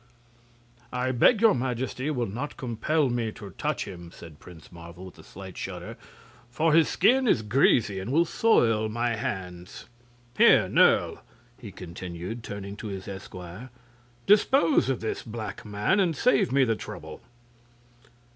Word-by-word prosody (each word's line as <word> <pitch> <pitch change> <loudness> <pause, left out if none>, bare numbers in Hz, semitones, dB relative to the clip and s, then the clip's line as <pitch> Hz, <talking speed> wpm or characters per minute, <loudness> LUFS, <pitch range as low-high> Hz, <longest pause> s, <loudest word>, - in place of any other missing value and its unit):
"I 125 +1 -1
beg 200 - +4
your 225 - +6
Majesty 130 +2 -3
will 125 -6 -1
not 125 +9 -6
compel 135 +5 0
me 120 -3 -2
to 100 -5 -10
touch - - -3
him," 85 -3 -9
said 80 -4 -13
Prince 85 -2 -14
Marvel, 85 +1 -11
with 90 -2 -13
a - - -13
slight 95 +2 -11
shudder; - - -6 0.5
"for 155 +6 +1
his 165 0 +5
skin 260 +1 +3
is 115 - +2
greasy, 110 -3 +2
and 95 +6 -5
will 165 +4 +3
soil 115 - +2
my 120 +1 -1
hands. 90 -4 -6 0.5
Here, - - +6
Nerle!" - - +3 0.4
he 110 -5 -9
continued, 90 +4 -7
turning 100 -2 -7
to 110 - -7
his 95 -2 -7
esquire, 95 +3 -9 0.6
"dispose 265 - +4
of 130 - -1
this 110 - -3
black 110 -3 -7
man, 105 - 0
and 175 -5 +1
save 130 -2 +2
me 135 0 +4
the 115 -3 +1
trouble." - - -9
115 Hz, 150 wpm, -26 LUFS, 95-130 Hz, 0.6 s, your